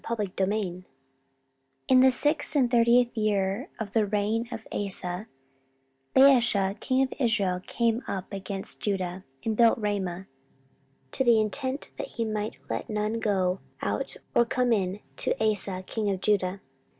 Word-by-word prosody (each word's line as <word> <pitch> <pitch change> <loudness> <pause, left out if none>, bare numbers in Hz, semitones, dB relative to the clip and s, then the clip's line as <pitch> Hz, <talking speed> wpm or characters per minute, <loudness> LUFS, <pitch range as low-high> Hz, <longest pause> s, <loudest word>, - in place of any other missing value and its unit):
14:016:001 195 -3 -2 1.0
In 255 - +6
the 260 +1 +7
six 295 +4 +1
and 255 -4 +3
thirtieth 240 0 +4
year 210 - 0
of 215 -3 -4
the 220 0 +2
reign 215 +3 0
of 225 - -7
Asa 190 0 -1 0.9
Baasha 230 -7 +5
king 260 +1 +1
of 260 - -3
Israel 205 -8 +1
came 235 0 0
up 190 -2 -3
against 195 0 -5
Judah, 190 -2 -2 0.2
and 220 -1 0
built 230 0 +5
Ramah, 195 -4 -2 0.9
to - - +1
the 235 -3 +5
intent 260 +6 -2
that - - -3
he 230 - 0
might 215 -1 -3
let - - -4
none 215 +1 -1
go 190 -4 0 0.2
out - - -2 0.2
or 235 - +5
come 245 +1 +1
in 195 -1 -1 0.2
to - - 0
Asa 205 -4 0
king 215 0 -2
of 195 -2 -1
Judah. 195 -1 0
215 Hz, 145 wpm, -27 LUFS, 195-235 Hz, 1.0 s, the